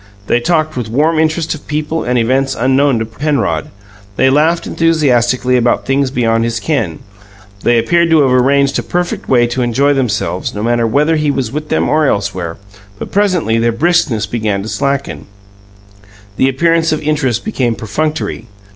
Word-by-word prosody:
They 120 - +1
talked 155 +3 0
with 120 -3 -4
warm 155 +7 +1
interest 160 +1 0
of 155 - -11
people 155 +2 -2
and 125 0 0
events 130 +3 +1
unknown 135 +1 +2
to 110 - -2
Penrod; 115 - -2 0.5
they 130 +5 +3
laughed 160 +4 +2
enthusiastically 130 -6 +1
about 120 0 +1
things 135 0 +1
beyond 115 -3 0
his 115 -1 -2
ken; 110 - -2 0.6
they 120 0 +2
appeared 170 +9 +2
to 160 -2 +4
have 135 -2 +2
arranged 140 +2 +2
a - - -1
perfect 175 0 -3
way 120 -2 +4
to 120 +2 -2
enjoy 130 +4 +2
themselves, 110 -9 -2
no 105 - -4
matter 120 0 +1
whether 150 +7 +2
he 150 -1 0
was 135 -5 -2
with 150 +1 -5
them - - +1
or 155 -1 +2
elsewhere 95 -7 -2 0.4
but - - -7
presently 180 - +1
their 115 +1 +2
briskness 125 -5 +1
began 105 -3 -2
to 110 - -6
slacken; 140 +2 -2 1.1
the 130 - +2
appearance 165 +4 +1
of 155 - 0
interest 145 -6 -1
became 125 - -1
perfunctory. 150 +2 -3
135 Hz, 170 wpm, -14 LUFS, 115-155 Hz, 1.1 s, to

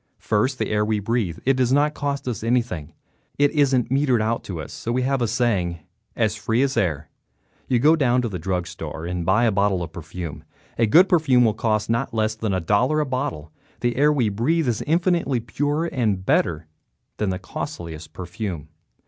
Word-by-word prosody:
First, 115 +5 0
the - - -2
air 105 0 +2
we 105 0 0
breathe. 105 -5 -1
It 135 - +4
does 130 -1 +1
not 145 +2 +3
cost 140 -2 -3
us 115 -4 -3
anything, 115 -10 -1 0.4
it 145 0 +3
isn't 130 -5 +2
metered 135 -3 +2
out 115 +2 -1
to 90 -4 -5
us, 75 - -7
so 115 - -4
we 125 +1 0
have 135 0 0
a 120 - +2
saying, 105 -7 0 0.4
"as 110 -2 +1
free 110 +4 0
as 135 -1 0
air." 80 -5 -1 0.6
You 125 - +2
go 150 +7 +5
down 125 -5 +2
to - - 0
the 95 -5 -5
drug 90 +1 -2
store 80 -2 -7
and 90 0 -3
buy 95 +7 +3
a 115 - +3
bottle 100 -2 +1
of 80 -1 -8
perfume. 80 -3 -7 0.4
A 115 - +4
good 175 - +6
perfume 135 -9 +4
will 110 - +2
cost 110 0 0
not 115 +1 -1
less 110 0 +1
than 110 -1 -3
a 95 - +1
dollar 105 - +2
a 150 - +1
bottle. 80 - -3 0.3
The 120 -1 0
air 150 +3 +4
we 130 -7 +1
breathe 145 +10 0
is 115 -3 0
infinitely 170 -5 +1
purer 145 +8 -1
and 110 - -1
better 80 -4 +1 0.5
than 105 - 0
the 95 - -1
costliest 85 -4 -7
perfume. 90 -3 -6
115 Hz, 200 wpm, -23 LUFS, 90-130 Hz, 0.6 s, good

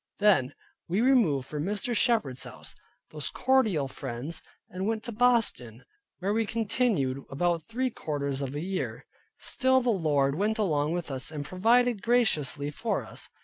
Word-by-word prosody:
Then 200 -11 +3 0.3
we 185 +4 0
removed 225 - +3
from 150 -1 -3
Mr. 210 +4 -1
Shepard's, 210 - +1 0.6
those 150 -2 -4
cordial 220 - +2
friends, 135 +4 -5 0.3
and 185 +2 -4
went 220 0 -1
to 235 - -5
Boston, 220 - +1 0.3
where 195 +3 -1
we 225 0 +1
continued 205 - 0
about 170 +4 0
three 255 +2 -1
quarters 140 -6 -3
of 135 0 -4
a 145 - -2
year. 190 +2 -3 0.3
Still 260 0 +2
the 245 -1 +1
Lord 145 -8 +2
went 210 +7 0
along 155 -7 +1
with 175 -4 -3
us, 130 -1 -4
and 150 -2 -5
provided 230 - +3
graciously 155 - +1
for - - -2
us. - - -6
185 Hz, 150 wpm, -28 LUFS, 145-225 Hz, 0.6 s, Then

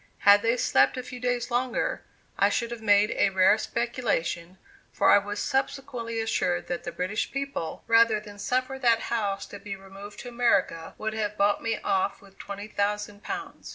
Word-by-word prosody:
Had 205 0 +8
they 230 +2 +2
slept 135 - +3
a 255 - -3
few 250 0 -8
days 245 0 -1
longer, 245 +1 0 0.3
I - - +3
should 235 -1 -1
have 235 -2 -6
made 205 -1 +4
a - - +3
rare 190 +3 +4
speculation, 215 -8 -2 0.3
for - - +3
I - - +8
was 205 +1 -5
subsequently 265 -4 -2
assured 90 - 0
that 175 - -3
the - - -3
British 195 +4 -2
people, 275 -12 -4
rather 230 -1 +5
than 205 -1 -12
suffer 255 +5 -1
that 235 -3 +4
house 200 -3 -1
to 205 - -10
be 200 0 -6
removed 195 +1 -11
to 245 - -8
America, 220 -9 +1
would 220 0 -3
have 210 -1 -2
bought 205 +1 +2
me 225 -1 -1
off 190 -1 0
with 195 -1 -19
twenty 200 +1 -7
thousand 205 0 -2
pounds. 390 - -6
215 Hz, 185 wpm, -27 LUFS, 200-240 Hz, 0.3 s, Had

